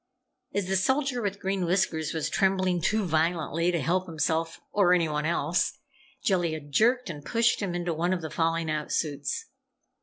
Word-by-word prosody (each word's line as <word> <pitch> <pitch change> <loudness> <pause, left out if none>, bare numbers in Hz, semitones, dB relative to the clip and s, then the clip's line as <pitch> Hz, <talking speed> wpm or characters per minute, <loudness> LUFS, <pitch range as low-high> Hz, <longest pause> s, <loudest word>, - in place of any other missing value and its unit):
As 200 -2 +1
the 190 +1 +1
Soldier 265 +4 +1
with 200 -1 -2
Green 190 -1 -1
Whiskers 175 -3 0
was 160 -2 -1
trembling 185 -3 +1
too 215 +4 +1
violently 165 +1 +1
to 170 - 0
help 180 +6 0
himself 165 0 -1
or 190 -3 +4
anyone 155 -3 +1
else, 170 0 0 0.5
Jellia 175 -8 +1
jerked 220 - +1
and 145 -2 -9
pushed 230 +8 +2
him 185 -4 -2
into 175 -1 -1
one 170 +3 0
of 180 -3 -1
the 160 - -5
falling 165 0 0
out 150 -1 -3
suits. 145 - -2
175 Hz, 170 wpm, -27 LUFS, 160-195 Hz, 0.5 s, or